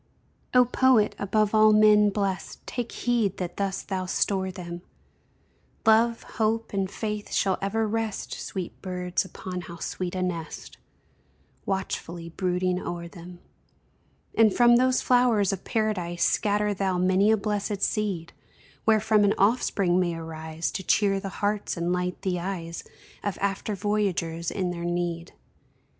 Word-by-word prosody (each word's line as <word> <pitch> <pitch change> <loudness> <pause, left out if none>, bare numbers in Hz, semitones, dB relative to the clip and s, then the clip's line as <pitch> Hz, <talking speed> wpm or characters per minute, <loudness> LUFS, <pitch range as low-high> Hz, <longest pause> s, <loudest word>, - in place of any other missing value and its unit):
O 250 0 +7
Poet! 250 -3 +3
above 210 +1 +1
all 215 0 +6
men 210 -1 +6
blest, 200 -2 -3
Take 245 -2 -4
heed 230 -6 0
that 180 -2 -5
thus 195 -1 -2
thou 185 -2 -3
store 190 0 0
them; 175 -2 -7 1.0
Love, 230 +1 +4
Hope, 225 0 -1
and 195 -1 0
Faith 210 0 -4
shall 190 -2 +1
ever 215 +3 0
rest, 225 -1 -3
Sweet 185 -3 -6
birds 180 -1 -1
(upon 185 -1 -6
how 170 0 -9
sweet 180 +2 -4
a 185 - -1
nest!) 170 -3 -5 0.9
Watchfully 175 -3 -3
brooding 180 +1 -1
o'er 170 0 -5
them. 175 +1 -12 0.9
And 225 -2 +5
from 240 +2 +5
those 255 +1 +2
flowers 235 -6 +3
of 190 - -6
Paradise 200 -7 -1
Scatter 210 0 +2
thou 190 -2 0
many 185 +3 +3
a 220 - +4
blessèd 205 -1 -2
seed, 190 -6 -1 0.5
Wherefrom 215 -1 +4
an 205 0 +3
offspring 195 -4 +2
may 175 -2 0
arise 160 0 -4
To - - -4
cheer 195 +1 +2
the 195 - -5 0.2
hearts 205 -2 -1
and 170 +1 0
light 180 0 -2
the 185 -3 0
eyes 170 -2 -5 0.4
Of 205 -2 -2
after 200 +1 -1
voyagers 185 -5 -1
in 185 -3 -2
their 170 -1 -5
need. 175 0 -2
195 Hz, 145 wpm, -26 LUFS, 180-215 Hz, 1.0 s, O